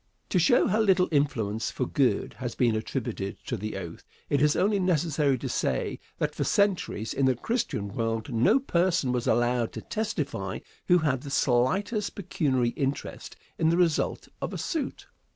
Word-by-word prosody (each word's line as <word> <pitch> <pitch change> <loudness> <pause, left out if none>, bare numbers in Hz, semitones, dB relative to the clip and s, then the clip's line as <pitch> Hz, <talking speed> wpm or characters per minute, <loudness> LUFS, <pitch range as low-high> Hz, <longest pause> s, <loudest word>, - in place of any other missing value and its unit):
To 185 - +2
show 175 +8 +4
how 215 +1 +1
little 190 -4 +4
influence 115 -8 0
for - - -2
good - - +1
has - - -4
been 120 -3 +2
attributed 110 -3 -3
to 120 - -2
the 110 0 -4
oath, - - -7 0.3
it 140 - +3
is 150 0 +4
only 200 +2 +2
necessary 155 -6 +2
to - - -5
say - - -1 0.2
that - - -1
for - - -2
centuries, 195 - +1
in 135 - +2
the 130 - +3
Christian 225 - -2
world, 115 +2 -2
no 155 - +4
person 175 - +1
was 125 -1 -1
allowed 120 -1 +1
to - - -6
testify 220 0 -3 0.3
who 180 - +6
had 145 -6 0
the 140 - -8
slightest 185 - +1
pecuniary 140 -10 0
interest 135 +3 -4 0.2
in 160 - +3
the 170 - +2
result 170 -4 +1
of - - -3
a - - -3
suit. 310 -6 -3
145 Hz, 170 wpm, -27 LUFS, 120-185 Hz, 0.3 s, who